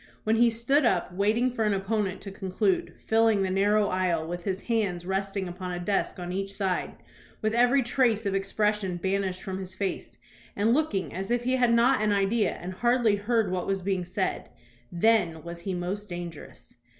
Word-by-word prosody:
When 220 +1 +2
he 240 +1 +5
stood 235 +6 +2
up, 180 -7 +1
waiting 215 +6 +2
for 230 -2 -1
an 210 -2 +2
opponent 195 0 -1
to 195 - -7
conclude, 190 0 -1
filling 225 -2 +3
the 190 - -1
narrow 205 +2 +3
aisle, 180 -4 0
with 175 +1 -5
his 190 -1 -2
hands 200 -7 -1
resting 195 0 -2
upon 180 +1 -6
a 175 - -3
desk 195 +3 -1
on 175 -1 -5
each 195 +1 -3
side, 190 -3 -1 0.5
with 215 0 +1
every 245 +3 +4
trace 235 -3 +1
of 200 - 0
expression 195 -1 0
banished 190 0 -1
from 190 0 -4
his 190 0 -6
face, 195 -1 -4 0.4
and 215 +3 +2
looking 255 -10 0
as 190 +3 -4
if 240 0 +1
he 255 +1 +1
had 245 -2 +3
not 240 +1 +4
an 215 -1 +2
idea 205 +2 +2
and 180 +1 -7
hardly 240 0 +2
heard 215 0 0
what 180 -1 -2
was 195 -1 -1
being 190 -1 0
said, 185 +2 -3 0.4
then 175 -4 +2
was 170 0 -7
he 185 +2 -3
most 195 +4 -4
dangerous. 175 -7 -8
195 Hz, 190 wpm, -27 LUFS, 185-225 Hz, 0.5 s, he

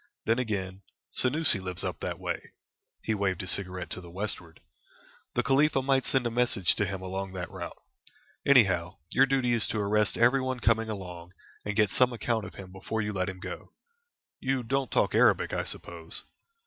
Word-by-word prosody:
Then, 115 +2 +2
again, 95 -5 -3 0.3
Senoussi 135 -3 +3
lives 90 -1 -4
up - - -3
that - - -3
way" - - -5 0.5
he 110 - 0
waved 100 -2 0
his 90 - 0
cigarette 90 -2 0
to 90 - -5
the 85 - -11
westward 90 -3 -3 0.8
"the 125 - +2
Khalifa 135 +1 +3
might 135 -1 +2
send 130 -2 +1
a 120 - 0
message 120 -6 +3
to 105 - +1
him 95 0 -4
along 95 +1 -4
that 90 -2 -5
route. - - -7 0.7
Anyhow, 95 -10 +4
your 135 +1 +5
duty 130 -2 +2
is 115 -2 +1
to - - -2
arrest 105 0 +2
everyone 130 +1 +3
coming 115 -1 +2
along, 90 -4 -7 0.3
and 105 0 -3
get 105 -2 +3
some 125 -1 +4
account 115 -2 -1
of 95 - -10
him 95 -2 -9
before 100 +4 -3
you 105 0 -3
let 95 0 -1
him 95 -1 -7
go. - - -8 0.7
You 130 -1 0
don't 135 +1 0
talk - - +2
Arabic, - - +4
I - - 0
suppose?" 85 -1 -5
105 Hz, 185 wpm, -29 LUFS, 95-125 Hz, 0.8 s, your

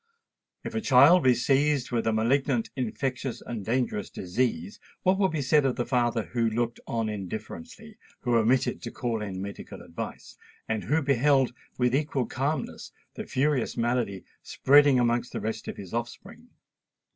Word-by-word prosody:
If - - -6
a 225 - -1
child 150 +2 +6
be 130 -1 +5
seized 140 +1 +1
with 115 -2 0
a - - +3
malignant, 120 +2 +1
infectious, 130 0 -3
and 115 -4 -6
dangerous 115 -2 -1
disease, 95 -1 -2 0.2
what 190 +1 +3
would 190 -2 +3
be 155 -3 -2
said 150 +3 +4
of 135 -2 +1
the 120 - -2
father 120 -3 +1
who 115 0 0
looked 120 +1 -2
on 115 -1 -1
indifferently—who 120 - -6
omitted 120 +3 +2
to - - -5
call 115 -3 -3
in 95 -3 -5
medical 100 0 -8
advice—and 105 +5 -7
who 155 +4 +1
beheld, 135 -1 +3 0.2
with 125 -1 +1
equal 140 -2 0
calmness, 140 +7 -3 0.2
the - - -7
furious 140 -2 0
malady 115 -5 -1 0.2
spreading 145 -1 +4
amongst 120 0 +1
the - - -2
rest 110 0 -4
of - - -5
his 95 -1 -9
offspring! 120 0 -6
125 Hz, 155 wpm, -27 LUFS, 115-140 Hz, 0.2 s, child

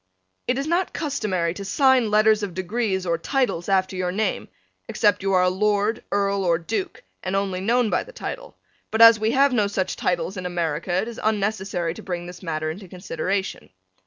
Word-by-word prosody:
It 250 - +1
is 275 - -2
not 345 +3 0
customary 190 - -1
to 200 - -7
sign 260 +2 +3
letters 215 0 +4
of 195 -4 -4
degrees 190 0 -1
or 170 -2 0
titles 245 - -1
after 190 -1 +1
your 180 -1 -1
name, 215 +4 -1 0.4
except 205 -3 +2
you 195 0 0
are 180 -1 +4
a 180 - +4
lord, 210 +3 0
earl 200 -1 +1
or 170 -2 +2
duke 190 +4 -4 0.2
and 185 +1 -3
only 195 -2 -1
known 235 +2 +2
by - - +1
the - - -13
title, - - -7 0.3
but 220 - -2
as 230 -1 +9
we 220 +1 +1
have 270 +2 +3
no 210 -4 +2
such 190 -2 -2
titles 175 +2 -1
in 180 0 -3
America 170 -1 -2
it 185 +5 0
is 235 - -7
unnecessary 195 -5 -1
to - - -10
bring 175 -2 -4
this 180 0 -10
matter 155 -3 -2
into 190 +4 -9
consideration. 185 +2 -3
195 Hz, 195 wpm, -23 LUFS, 180-220 Hz, 0.4 s, as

